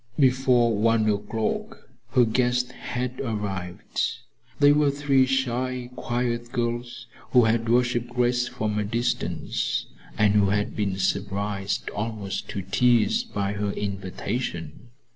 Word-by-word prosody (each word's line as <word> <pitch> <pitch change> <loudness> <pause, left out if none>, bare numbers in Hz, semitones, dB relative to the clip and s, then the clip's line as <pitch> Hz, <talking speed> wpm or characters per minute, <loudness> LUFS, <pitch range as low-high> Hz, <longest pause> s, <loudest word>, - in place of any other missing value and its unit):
Before 125 -4 +4
one 110 +1 +3
o'clock 105 +1 -2 0.3
her 125 - +6
guests 125 +2 +1
had 125 0 -4
arrived. 100 -7 -3 0.6
They 145 0 +7
were 145 0 +4
three 140 -2 +3
shy, 130 -1 -1
quiet 120 -1 -2
girls 120 0 -3 0.3
who 125 -2 +7
had 115 +1 +1
worshiped 120 0 +2
Grace 125 0 +1
from 105 -2 -2
a - - +1
distance, 115 +4 -1 0.3
and 105 -1 +4
who 100 -2 +4
had 105 +1 0
been 100 -3 -1
surprised 100 +1 -1
almost 105 -2 -4
to 100 - -4
tears 120 - +3
by 100 - -2
her 105 0 -2
invitation. 100 +2 -4
115 Hz, 125 wpm, -25 LUFS, 105-125 Hz, 0.6 s, They